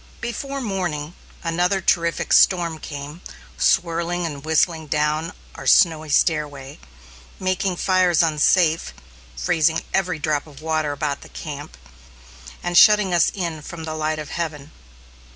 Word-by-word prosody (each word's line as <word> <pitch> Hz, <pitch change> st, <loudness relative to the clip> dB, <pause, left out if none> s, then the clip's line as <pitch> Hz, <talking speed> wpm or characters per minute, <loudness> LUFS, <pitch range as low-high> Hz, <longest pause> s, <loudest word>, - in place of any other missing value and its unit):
Before 275 Hz, +4 st, -4 dB
morning, 175 Hz, -, -3 dB, 0.3 s
another 175 Hz, +3 st, +1 dB
terrific 170 Hz, -2 st, 0 dB
storm 170 Hz, -4 st, +4 dB
came 145 Hz, +3 st, -8 dB, 0.3 s
swirling 170 Hz, -, +1 dB
and 145 Hz, -4 st, -6 dB
whistling 160 Hz, 0 st, +1 dB
down 150 Hz, +3 st, 0 dB, 0.2 s
our -, -, -8 dB
snowy 160 Hz, -3 st, +4 dB
stairway, 145 Hz, -3 st, 0 dB, 0.6 s
making 185 Hz, 0 st, -1 dB
fires 180 Hz, -2 st, +3 dB
unsafe, 160 Hz, +1 st, +2 dB, 0.4 s
freezing 155 Hz, -, +1 dB
every 185 Hz, -4 st, 0 dB
drop 150 Hz, 0 st, -1 dB
of 140 Hz, -3 st, -14 dB
water 155 Hz, -1 st, -1 dB
about 145 Hz, -1 st, -3 dB
the -, -, -13 dB
camp, -, -, -8 dB, 0.9 s
and 175 Hz, 0 st, -2 dB
shutting 210 Hz, -3 st, +6 dB
us 175 Hz, -, +4 dB
in 170 Hz, -5 st, -4 dB
from 165 Hz, +2 st, -8 dB
the 160 Hz, 0 st, -4 dB
light 155 Hz, 0 st, -2 dB
of 150 Hz, -2 st, -6 dB
heaven. 155 Hz, -3 st, -5 dB
160 Hz, 130 wpm, -22 LUFS, 150-175 Hz, 0.9 s, shutting